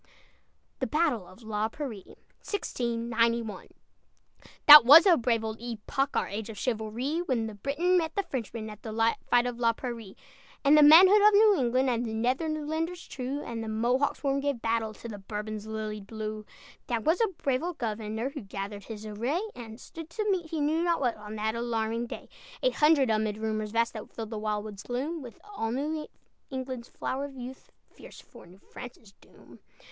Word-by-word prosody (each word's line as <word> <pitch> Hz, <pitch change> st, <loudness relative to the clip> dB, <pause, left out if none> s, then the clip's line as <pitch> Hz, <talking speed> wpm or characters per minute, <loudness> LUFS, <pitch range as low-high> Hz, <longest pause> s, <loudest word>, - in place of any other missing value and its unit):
THE 260 Hz, -, -1 dB
BATTLE 290 Hz, -, 0 dB
OF 205 Hz, +7 st, -16 dB
LA 215 Hz, 0 st, -1 dB
PRAIRIE 225 Hz, -7 st, -7 dB, 0.3 s
That 235 Hz, -, -1 dB, 1.2 s
was 295 Hz, -, +9 dB
a 365 Hz, -3 st, +7 dB
brave 230 Hz, -4 st, 0 dB
old 220 Hz, 0 st, -5 dB
epoch, 240 Hz, +4 st, -2 dB
Our -, -, 0 dB
age 210 Hz, +2 st, -5 dB
of 220 Hz, -, -8 dB
chivalry, 240 Hz, +7 st, -2 dB
When 255 Hz, -9 st, -1 dB
the 220 Hz, -, -6 dB
Briton 305 Hz, -, +1 dB
met 320 Hz, -1 st, -3 dB
the 400 Hz, -, 0 dB
Frenchman 230 Hz, -, -5 dB
At 210 Hz, -, -12 dB
the 220 Hz, -, -6 dB, 0.4 s
fight 245 Hz, 0 st, +4 dB
of 245 Hz, -1 st, -4 dB
La 230 Hz, -1 st, +3 dB
Prairie; 230 Hz, -5 st, -7 dB, 0.5 s
And 285 Hz, +2 st, +7 dB
the 305 Hz, -, +7 dB
manhood 365 Hz, +8 st, +8 dB
of 420 Hz, 0 st, +6 dB
New 420 Hz, 0 st, +6 dB
England, 255 Hz, +1 st, +2 dB
And 235 Hz, 0 st, -1 dB
the 220 Hz, -2 st, -4 dB
Netherlanders 310 Hz, +7 st, -2 dB
true 270 Hz, +2 st, -4 dB
And 230 Hz, -1 st, -5 dB, 0.2 s
Mohawks 255 Hz, +5 st, +1 dB
sworn, 275 Hz, -1 st, 0 dB
gave 280 Hz, -3 st, -1 dB
battle 225 Hz, -1 st, -1 dB
To 235 Hz, -, -9 dB
the 210 Hz, -3 st, -7 dB
Bourbon's 210 Hz, +1 st, -6 dB
lilied 215 Hz, -2 st, -5 dB
blue. 215 Hz, -1 st, -6 dB, 0.4 s
That 235 Hz, -3 st, -1 dB
was 325 Hz, +7 st, +2 dB
a 455 Hz, -, +4 dB
brave 260 Hz, -2 st, 0 dB
old 350 Hz, 0 st, -4 dB
governor 220 Hz, +2 st, -3 dB
Who 285 Hz, -, -7 dB
gathered 200 Hz, 0 st, -7 dB
his 220 Hz, -1 st, -8 dB
array, 235 Hz, -, -2 dB
And 225 Hz, -1 st, -10 dB
stood 325 Hz, +3 st, -10 dB
to 425 Hz, +5 st, -3 dB
meet, 350 Hz, -4 st, -1 dB
he 315 Hz, -2 st, -2 dB
knew 315 Hz, +3 st, +1 dB
not 340 Hz, -1 st, +1 dB
what, 245 Hz, -4 st, 0 dB
On 210 Hz, 0 st, -8 dB
that 215 Hz, +1 st, -1 dB
alarming 230 Hz, 0 st, -2 dB
day. -, -, -8 dB, 0.4 s
Eight -, -, +3 dB
hundred, 300 Hz, -5 st, +4 dB
amid 215 Hz, -1 st, 0 dB
rumors 215 Hz, -1 st, -2 dB
vast 230 Hz, +2 st, 0 dB
That 215 Hz, -2 st, -8 dB
filled 225 Hz, -1 st, -7 dB
the 220 Hz, -, -4 dB
wild 210 Hz, -1 st, -2 dB
wood's 205 Hz, -2 st, -8 dB
gloom, 285 Hz, +7 st, -3 dB
With 245 Hz, -3 st, -11 dB
all 405 Hz, -, -4 dB
New 300 Hz, +5 st, -3 dB, 0.4 s
England's 260 Hz, -2 st, -5 dB
flower 270 Hz, +2 st, -3 dB
of 280 Hz, -1 st, -10 dB
youth, 255 Hz, +1 st, -9 dB
Fierce -, -, -14 dB
for -, -, -15 dB
New 180 Hz, +2 st, -16 dB
France's 235 Hz, 0 st, -12 dB
doom. -, -, -18 dB
235 Hz, 185 wpm, -28 LUFS, 220-290 Hz, 1.2 s, was